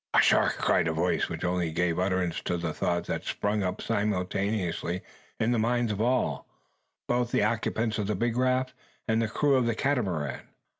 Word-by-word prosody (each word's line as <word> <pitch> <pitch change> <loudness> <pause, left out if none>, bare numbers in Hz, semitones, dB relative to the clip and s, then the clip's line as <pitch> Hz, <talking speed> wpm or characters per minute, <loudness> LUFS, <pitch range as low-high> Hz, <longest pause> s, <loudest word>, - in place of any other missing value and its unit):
"A - - +7
shark!" - - +3
cried - - +2
a 80 - 0
voice, 85 +3 0
which - - -5
only 90 -1 0
gave 85 +1 0
utterance 95 -2 0
to 90 - 0
the 85 -2 -3
thought 85 +2 -1
that - - -3
sprung 105 +1 -1
up 90 -1 -2
simultaneously 95 -3 -1 0.4
in 115 +2 +2
the 120 - +2
minds 120 0 +1
of 105 0 -2
all, 125 +2 0 0.6
both 120 0 +1
the - - +2
occupants 110 0 0
of 105 - -1
the 105 - 0
big 115 +4 0
raft, 130 +1 +1 0.3
and 110 0 +2
the 115 - +1
crew 140 +6 +1
of 130 -3 +3
the 115 - 0
Catamaran. 95 - -1
105 Hz, 190 wpm, -28 LUFS, 90-120 Hz, 0.6 s, A